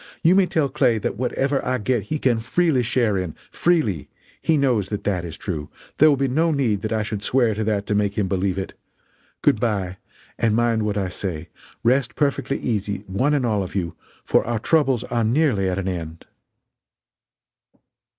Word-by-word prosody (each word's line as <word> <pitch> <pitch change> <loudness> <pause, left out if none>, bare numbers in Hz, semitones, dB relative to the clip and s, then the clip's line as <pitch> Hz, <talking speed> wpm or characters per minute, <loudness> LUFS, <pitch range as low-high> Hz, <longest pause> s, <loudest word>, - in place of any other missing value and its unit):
You 170 +2 +6
may 190 -1 +4
tell 155 -5 +1
Clay 130 -4 +2
that 105 - -2
whatever 135 +4 0
I 130 0 0
get 120 +1 0
he 155 - -2
can 125 -5 +1
freely 145 +4 +1
share 115 -4 +1
in 90 -4 -4 0.2
freely. 120 - +1 0.3
He 160 - +2
knows 125 -8 +1
that 105 -1 -4
that 95 -4 -1
is 85 -2 -7
true 80 -6 -4 0.3
there 155 - +8
will 145 - +3
be 135 0 +1
no 160 +6 +2
need 125 -10 +1
that 110 0 -3
I 110 -1 +1
should 105 -1 -4
swear 120 0 +2
to 110 +1 -2
that 105 -2 0
to 105 - -1
make 100 -1 0
him 100 -3 +1
believe 95 0 0
it. 95 - -4 0.7
Good - - +4
bye 100 -6 -1 0.4
and 110 -2 +2
mind 115 -2 +1
what 105 -1 -1
I 95 -2 0
say: 90 -4 -5 0.3
Rest 125 +1 +2
perfectly 140 -2 0
easy, 105 -4 -2
one 130 +11 +1
and 135 -4 +1
all 105 -4 +1
of 95 +1 -6
you, 85 -4 -2 0.3
for - - +3
our 120 -1 0
troubles 135 -1 +2
are 120 -1 -1
nearly 115 -5 +2
at 90 - -2
an 95 -1 -2
end." 85 -3 -5
110 Hz, 195 wpm, -22 LUFS, 100-135 Hz, 0.7 s, there